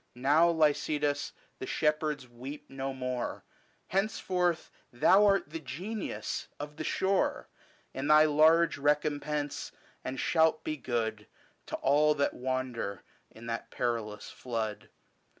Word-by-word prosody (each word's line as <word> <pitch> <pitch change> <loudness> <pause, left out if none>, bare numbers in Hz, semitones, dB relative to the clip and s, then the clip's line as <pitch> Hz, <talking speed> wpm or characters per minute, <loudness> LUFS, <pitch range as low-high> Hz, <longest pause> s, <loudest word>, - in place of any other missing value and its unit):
Now, 145 +7 +4
Lycidas, 150 -2 +1 0.3
the 130 - -5
shepherds 150 -3 0
weep 130 +5 -9
no 135 0 -3
more 125 -2 -4 0.5
j 190 - 0
Henceforth 180 -4 -1 0.2
thou 195 +12 +5
art 195 -7 +2
the 165 - -4
Genius 195 +8 -4
of 150 +1 -7
the 155 - -3
shore, 190 +4 0 0.4
In 135 +2 -3
thy 155 0 +7
large 155 +1 +4
recompense, 145 0 0 0.3
and 130 0 -4
shalt 160 -1 +3
be 155 - -2
good 120 -5 -2 0.4
To - - -3
all 150 +2 +3
that 140 -1 +1
wander 125 -6 -3 0.3
in 115 - -13
that 115 -1 -4
perilous 110 -4 -3
flood. 110 -4 -4
145 Hz, 125 wpm, -30 LUFS, 130-155 Hz, 0.5 s, thy